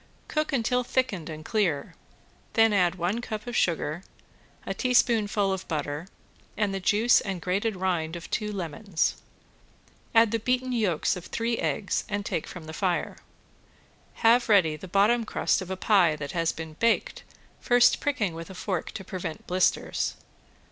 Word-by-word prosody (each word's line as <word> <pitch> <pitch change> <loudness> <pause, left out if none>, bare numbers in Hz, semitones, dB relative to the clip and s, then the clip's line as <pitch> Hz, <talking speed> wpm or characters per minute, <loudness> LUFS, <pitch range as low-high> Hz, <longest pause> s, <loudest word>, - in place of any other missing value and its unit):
Cook 305 0 -1
until 250 -1 +1
thickened 240 -10 -1
and 155 0 -8
clear, 195 -11 0 0.6
then 225 -1 +4
add 180 -3 +3
one 185 +6 -1
cup 215 -2 -5
of 245 -1 -5
sugar, 165 -3 0 0.6
a - - -2
teaspoonful 220 -6 +2
of 190 - -5
butter, 150 +1 -3 0.5
and 205 -2 0
the 195 - -2
juice 215 +6 +4
and 195 -3 -4
grated 195 +5 -1
rind 175 -3 -1
of 170 - -7
two 210 0 -1
lemons. 185 -1 -2 0.9
Add 225 -1 +6
the 230 - 0
beaten 255 +3 0
yolks 205 -11 +1
of 180 - -8
three 230 0 -1
eggs 195 - -1
and 205 0 -2
take 160 - -2
from 180 - -9
the 160 - -8
fire. 180 0 -1 1.1
Have 235 +1 +5
ready 180 -7 +4
the 185 - -9
bottom 205 +6 +3
crust 215 - 0
of 185 - -7
a 190 - -3
pie 185 -6 +4
that 145 -2 -6
has 165 -2 0
been 160 -1 -8
baked, 230 +8 0 0.4
first 245 0 +4
pricking 265 - -1
with 165 +2 -8
a 190 - -9
fork 185 -2 -3
to 200 - -6
prevent 180 -4 -6
blisters. 185 +1 0
195 Hz, 160 wpm, -27 LUFS, 170-225 Hz, 1.1 s, Add